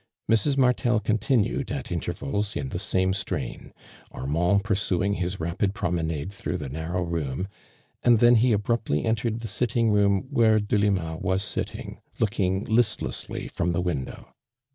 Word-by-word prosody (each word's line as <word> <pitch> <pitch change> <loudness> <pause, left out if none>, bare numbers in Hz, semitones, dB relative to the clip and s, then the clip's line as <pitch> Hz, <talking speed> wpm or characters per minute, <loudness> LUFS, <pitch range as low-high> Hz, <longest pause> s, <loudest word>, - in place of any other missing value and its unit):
Mrs. 115 +6 +2
Martel 125 -3 +3
continued 110 +2 0
at - - -4
intervals, 100 +9 -2
in 70 -2 -3
tlie 85 - -3
same 95 -1 +1
strain, 95 -1 -4 0.4
Armand 90 +9 +1
pur 105 0 0
suing 95 0 +1
his 90 +2 -3
rapid 90 +5 -1
promenade 80 -1 -2
through 100 - -3
the 70 -3 -5
narrow 80 +5 -2
room, 85 -1 -2 0.5
and 120 -1 +5
then 120 +2 +6
he 120 +1 +4
abruptly 105 -6 0
entered 115 0 0
the 115 - -4
sitting 115 -1 +1
room 100 -2 +3
where 115 -5 +4
Delima 100 -6 0
was 95 +3 0
sitting, - - -5 0.2
looking 100 -3 0
listlessly 110 -1 0
from 85 0 -1
the 85 - 0
window. 80 -8 -4
100 Hz, 145 wpm, -26 LUFS, 85-110 Hz, 0.5 s, then